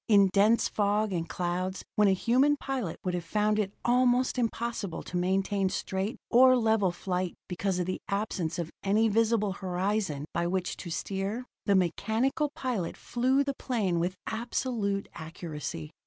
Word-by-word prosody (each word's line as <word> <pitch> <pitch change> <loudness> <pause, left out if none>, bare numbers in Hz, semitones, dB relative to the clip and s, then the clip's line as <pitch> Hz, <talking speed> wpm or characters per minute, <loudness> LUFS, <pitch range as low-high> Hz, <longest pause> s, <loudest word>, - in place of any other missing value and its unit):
In 200 -3 +6
dense 215 +3 +4
fog 210 0 +1
and 170 -1 -2
clouds, 180 +1 -2
when 210 -1 +5
a 195 - +5
human 260 +9 +3
pilot 260 - -3
would 180 - -1
have 175 -1 -2
found 210 +4 +1
it 195 -2 0
almost 250 +1 +3
impossible 230 -6 -2
to - - -8
maintain 190 +2 +1
straight 190 +3 -2
or 255 +1 +7
level 220 -5 +2
flight 180 0 -3
because 185 +1 -1
of 180 - 0
the 185 - -3
absence 200 -5 -2
of 170 -2 -3
any 215 +3 +3
visible 220 -1 +2
horizon 185 -4 -1
by 170 0 0
which 185 0 -1
to 175 - -7
steer, 195 +7 -3 0.2
the 200 - +4
mechanical 220 - +1
pilot 230 -10 -2
flew 260 +3 +1
the 280 0 -2
plane 210 -10 -1
with 180 +2 -1
absolute 220 -3 -2
accuracy. 155 - -6
200 Hz, 155 wpm, -29 LUFS, 180-230 Hz, 0.2 s, or